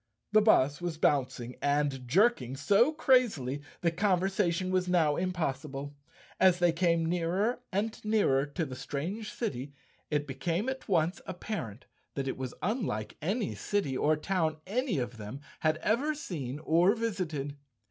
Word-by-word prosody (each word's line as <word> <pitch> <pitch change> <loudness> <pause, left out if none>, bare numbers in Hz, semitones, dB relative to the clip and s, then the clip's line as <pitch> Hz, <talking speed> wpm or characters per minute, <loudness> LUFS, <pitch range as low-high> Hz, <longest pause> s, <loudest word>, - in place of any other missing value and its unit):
The 215 0 +6
bus 145 -9 +4
was 175 -2 -3
bouncing 125 -5 0
and 145 -3 0
jerking 155 - +2
so 205 - +4
crazily 220 - +2 0.2
that 170 -1 0
conversation 185 -2 +1
was 185 -1 +1
now 165 -5 +3
impossible. 145 -5 -3 0.4
As 185 -2 +6
they 175 -1 +4
came 170 -1 +2
nearer 180 +8 0
and 210 +3 -2
nearer 200 -11 +2
to 160 +3 -2
the 130 -3 -7
strange 170 - -4
city, 145 - -4 0.3
it 150 -1 0
became 165 - -2
at 265 0 -5
once 175 0 +1
apparent 140 - -5 0.3
that 135 -1 -2
it 130 - -1
was 130 -1 -5
unlike 180 - -2
any 200 +7 -1
city 200 -10 -1
or 150 +4 +3
town 160 -2 0
any 230 - -1
of 120 -2 -3
them 110 +5 -7 0.2
had 155 0 +2
ever 280 +8 +1
seen 145 - -5
or 175 +7 +4
visited. 170 -11 -3
170 Hz, 145 wpm, -30 LUFS, 140-200 Hz, 0.4 s, The